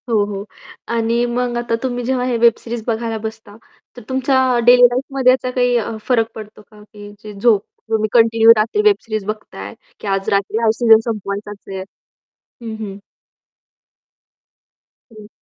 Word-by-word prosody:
हो, 215 -3 +2
हो. 200 -1 -6 0.4
आणि 235 +1 0
मग 240 0 -2
आता 240 -1 -1
तुम्ही 245 -1 -2
जेव्हा 255 0 0
हे 250 -2 0
वेब 235 0 +5
सीरीज 235 -1 -6
बघायला 225 -1 -2
बसता, 220 -2 -8 0.4
तर - - -9
तुमच्या 260 0 +1 0.3
डेली 245 0 +7
लाईफमध्ये 255 +1 +3
याचा 255 0 -1
काही 245 -1 +1
अ, 225 -1 -3
फरक 230 -3 +1
पडतो 215 0 -10
का? 210 +1 -19
की 210 0 -12
झोप 205 0 +2 0.3
तुम्ही 215 -1 0
कंटिन्यू 225 -1 +4
रात्री 220 - +1
वेब 420 -1 +4
सीरीज 215 -3 -4
बघताय, 195 - -7 0.3
की - - -8
आज 195 0 -1
रात्री 200 +2 0
हा 225 - +4
सीजन 225 -1 +5
संपवायचाच 205 -1 -5
आहे? 190 -1 -5 0.8
हं, 225 -2 -6
हं. 195 -1 -8 2.1
हं. 215 -2 -13
225 Hz, 155 wpm, -18 LUFS, 210-245 Hz, 2.1 s, डेली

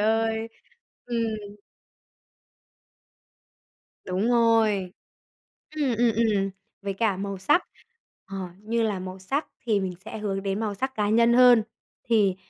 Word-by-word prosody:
ơi, 225 +1 +1 0.6
ừm. 220 -4 -3 2.5
Đúng 190 +5 -1
rồi. 225 -6 +3 0.8
Ừm, 280 -5 +1
ừm, 235 -1 +4
ừm, 210 -3 +1 0.3
với 200 0 -3
cả 205 -1 +1
màu 195 0 -4
sắc, 295 - +3 0.6
ờ, 195 - -7 0.3
như 230 +2 0
là 210 -4 0
màu 185 0 -7
sắc 270 +11 -2 0.2
thì 215 -3 +2
mình 185 -2 -3
sẽ 220 - -7
hướng 195 -2 -2
đến 195 +1 -2
màu 215 -2 -2
sắc 265 +6 -3
cá 210 -3 0
nhân 230 +2 +4
hơn. 245 -3 +7 0.5
Thì, 205 -5 +3
215 Hz, 130 wpm, -26 LUFS, 195-230 Hz, 2.5 s, hơn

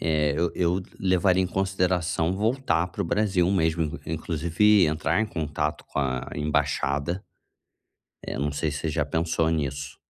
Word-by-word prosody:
eh, 75 -2 +1
eu 85 +2 0
eu 90 +1 +1 0.2
levaria 95 0 +3
em - - 0
consideração 90 -3 0
voltar 110 -3 +1
para - - -3
o - - -3
Brasil 95 -1 +1
mesmo, 80 -4 +1
porque 80 0 -7
inclusive 85 +6 +3
entrar 80 +3 0
em 110 - +1
contato 75 -4 -3
com - - -5
a 65 -3 -1
embaixada, 75 +3 0 1.0
é, - - -5
não 70 +1 -1
sei 75 +2 -1
se 75 - -4
você 80 - -2
já 75 -1 0
pensou 80 +1 0
nisso. 70 -3 -3
80 Hz, 160 wpm, -26 LUFS, 75-90 Hz, 1.0 s, levaria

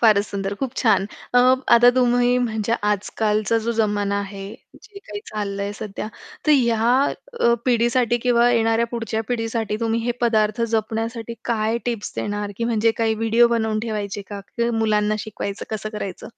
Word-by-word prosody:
फारच 210 -3 +5
सुंदर 195 0 -3
खूप 265 -3 -2
छान. 220 -4 +3 0.3
अ, - - +7 0.4
आता 240 +1 +7
तुम्ही 245 0 +3
म्हणजे 225 -2 -1 0.2
आजकालचा 215 +2 0
जो 235 - +1
जमाना 205 -2 0
आहे 195 -1 -7 0.4
जे 415 -2 -12
काही 205 - -8
चाललंय 200 -1 -3
सध्या 210 0 -6 0.4
तर - - +4
या 235 -5 +3 0.6
अ, 235 0 +5
पिढीसाठी 240 0 +2
किंवा 240 -1 +4
येणाऱ्या 225 0 +2
पुढच्या 225 -2 -2
पिढीसाठी 225 -2 -2
तुम्ही 230 0 0
हे 240 - +1
पदार्थ 220 -2 +2
जपण्यासाठी 225 +1 -2
काय 225 0 0
टिप्स 230 -4 -3
देणार 205 0 -3
की 230 - -2
म्हणजे 225 -1 +2
काही 225 -1 +2
व्हिडिओ 225 +2 +3
बनवून 220 -2 0
ठेवायचे 205 -3 -4
का? 200 0 -8
की 235 +4 -2
मुलांना 215 -2 +1
शिकवायचं 200 -1 -5
कसं 215 -1 -3
करायचं? 210 -4 -6
225 Hz, 160 wpm, -22 LUFS, 210-235 Hz, 0.6 s, अ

